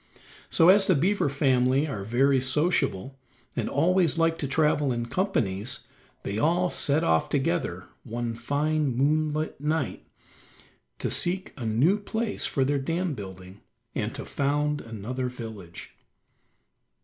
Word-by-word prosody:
So, 165 - +5
as 195 +1 +6
the 185 - +4
beaver 180 +2 +2
family 135 0 +2
are 105 -9 -4
very 130 +5 +2
sociable, 135 - 0 0.4
and - - -1
always 170 +2 +2
like 165 0 +2
to 140 - -2
travel 150 -1 +2
in 120 -1 -2
companies, 120 - -1 0.4
they 100 +2 -3
all 175 +5 +2
set 150 -1 0
off 80 -1 +2
together - - -1 0.2
one 120 0 -3
fine 145 +3 0
moonlight 155 +2 0
night 150 -3 -2 0.9
to - - -2
seek 185 +2 0
a 120 -4 -5
new 145 - +3
place 220 +2 -2
for 135 - 0
their 140 +1 +1
dam 165 +4 -1
building, 95 -3 -9 0.3
and - - -3
to - - -6
found 145 +1 0
another 115 +3 -4
village. 110 -8 -9
140 Hz, 135 wpm, -26 LUFS, 120-160 Hz, 0.9 s, as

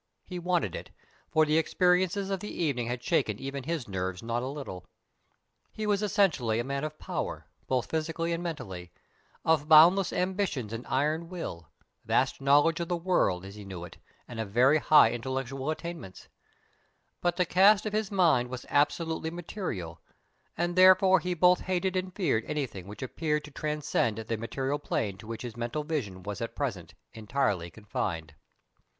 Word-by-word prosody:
He 180 -1 -6
wanted 175 - 0
it, - - -7 0.4
for 155 0 +4
the 155 +1 +3
experiences 185 +3 +1
of 195 - -1
the 210 - -6
evening 135 -8 -1
had 120 0 -4
shaken 105 -3 +1
even 135 +1 -5
his 160 -5 -3
nerves 95 -1 -3
not 115 +1 -1
a 130 - -3
little. 135 -10 -6 0.9
He 215 - -4
was 205 -1 +1
essentially 170 - +2
a - - 0
man 140 +2 -3
of 155 0 -4
power, - - -4 0.2
both 130 -2 -1
physically 165 +1 -1
and 165 - -2
mentally, 95 - -6 0.5
of 155 -2 +2
boundless 170 +5 +7
ambitions 180 - -1
and 115 +2 -6
iron 155 +5 0
will, 85 - -6 0.3
vast - - +1
knowledge 145 +5 +4
of 170 - -2
the 175 - -1
world, 165 - +1
as 100 - -9
he 105 0 -10
knew 95 -3 -7
it, 90 - -13 0.3
and 115 - -8
of 110 -3 -3
very 130 +8 +4
high 155 +1 +6
intellectual 130 +3 -3
attainments; 165 - -6 0.9
but 175 -1 +1
the 180 - +2
cast 195 +4 +5
of 215 - -3
his 215 -2 0
mind 160 -11 +3
was 130 -1 -6
absolutely 160 +2 +1
material, 160 - -5 0.6
and 175 +1 -1
therefore 185 0 +7
he 180 +1 -2
both 180 +2 +5
hated 185 0 -1
and 185 0 -2
feared 140 - +1
anything 130 -11 -4
which 105 +6 -8
appeared 150 +3 -1
to 150 - -11
transcend 150 -7 -1
the 110 +1 -3
material 135 +5 -2
plane 105 -8 -2
to 100 +3 -13
which 115 0 -6
his 120 -3 -6
mental 120 +6 -3
vision 115 - -4
was 100 0 -5
at - - -4
present - - -4 0.2
entirely 105 -5 -1
confined. 85 -6 -4
150 Hz, 170 wpm, -29 LUFS, 115-175 Hz, 0.9 s, boundless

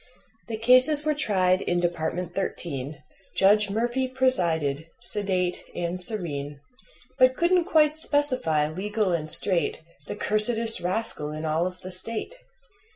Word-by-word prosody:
The 225 -2 -6
cases 255 +6 +3
were 305 - 0
tried 190 -10 0
in 175 - -2
Department 175 0 -4
Thirteen, 145 -7 -6 0.3
Judge 205 +1 +3
Murphy 240 +5 -2
presided, 170 - -1
sedate 185 -3 -2
and 175 +1 -4
serene, 145 -8 -3 0.6
But 255 0 +3
couldn't 345 0 +1
quite 310 -3 +1
specify, 255 - 0
legal 200 +5 -3
and 155 -2 -4
straight, 180 0 +5 0.3
The - - -6
cursedest 220 +2 +5
rascal 180 -5 -2
in 155 +1 -7
all 160 +3 -1
of 185 0 -11
the 185 - -9
State. 220 - -3
190 Hz, 130 wpm, -24 LUFS, 170-240 Hz, 0.6 s, straight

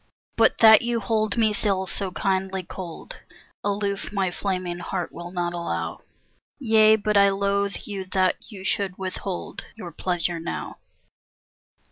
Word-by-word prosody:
But - - +4
that 220 0 +9
you 235 -1 0
hold 215 0 0
me 220 -2 +3
still 195 -3 0
so 190 +1 -3
kindly 190 0 -1
cold 185 - -8 0.5
Aloof 200 -1 -1
my 195 -3 0
flaming 180 -2 -2
heart 180 0 -3
will 175 0 -8
not 175 -1 -2
allow; 85 - -3 0.6
Yea, 220 -4 +5
but 210 -1 +1
I 200 0 +7
loathe 200 0 0
you 195 -2 -5
that 185 +4 0
you 195 -3 -9
should 190 -1 -1
withhold 190 0 -5
Your 180 -6 -8
pleasure 175 0 -2
now. 165 - -5
195 Hz, 140 wpm, -24 LUFS, 180-210 Hz, 0.6 s, that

